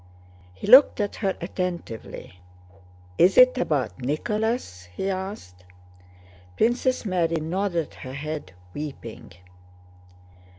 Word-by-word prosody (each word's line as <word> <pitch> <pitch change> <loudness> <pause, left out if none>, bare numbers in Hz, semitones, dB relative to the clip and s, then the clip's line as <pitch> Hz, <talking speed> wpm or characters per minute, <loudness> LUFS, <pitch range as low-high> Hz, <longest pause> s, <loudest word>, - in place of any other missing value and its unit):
He - - -8
looked 255 +5 +8
at 205 -1 -2
her 195 -3 -1
attentively. 170 - -5 0.8
"Is 185 +2 +5
it 255 0 +8
about 140 - -1
Nicholas?" 210 - -2
he 90 - -3
asked. 185 - -6 0.9
Princess 245 +2 +1
Mary 175 -4 0
nodded 170 +1 -2
her 130 -1 -9
head, 145 -8 -6 0.2
weeping. 140 -6 -8
170 Hz, 95 wpm, -25 LUFS, 135-205 Hz, 0.9 s, looked